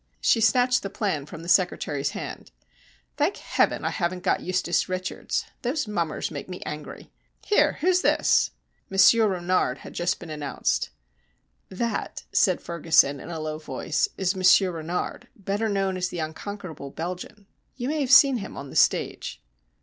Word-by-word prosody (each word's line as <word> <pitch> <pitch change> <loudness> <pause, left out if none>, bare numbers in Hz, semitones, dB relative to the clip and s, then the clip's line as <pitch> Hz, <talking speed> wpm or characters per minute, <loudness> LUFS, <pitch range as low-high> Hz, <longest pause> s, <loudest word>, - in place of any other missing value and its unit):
She 225 - +3
snatched 250 +3 +4
the 195 - -4
plan 175 -10 -2
from 160 +2 -9
the - - -9
secretary's 150 -6 +1
hand. - - -7 0.7
"Thank 310 +6 +1
Heaven, - - 0
I - - 0
haven't 180 -1 -2
got - - +2
Eustace 180 -1 0
Richards 185 0 -3 0.2
these 255 +2 -1
mummers 170 -7 -2
make - - -7
me 180 - -6
angry. 150 0 -8 0.3
Here, 415 - +3
who's 365 +2 +3
this?" - - +3 0.4
Monsieur 215 +4 +6
Renard 180 -8 0
had - - -9
just 175 +1 -1
been 170 -3 -9
announced. 150 -2 -1 0.8
"That," 215 +3 -3
said 185 -3 +3
Ferguson, 155 -4 +3
in - - -9
a 165 -2 -4
low 155 0 -4
voice, 160 - -1
"is 190 0 0
Monsieur 185 0 +5
Renard, 165 +1 -4
better 205 +2 -2
known 195 -2 0
as 180 0 -1
the - - -6
Unconquerable 160 -1 -6
Belgian. 180 +6 -6 0.3
You 245 -1 -4
may 305 0 0
have 265 -2 -1
seen 270 0 +8
him 200 -2 -7
on 140 -1 -7
the - - -11
stage." - - +1
185 Hz, 160 wpm, -25 LUFS, 165-210 Hz, 0.8 s, seen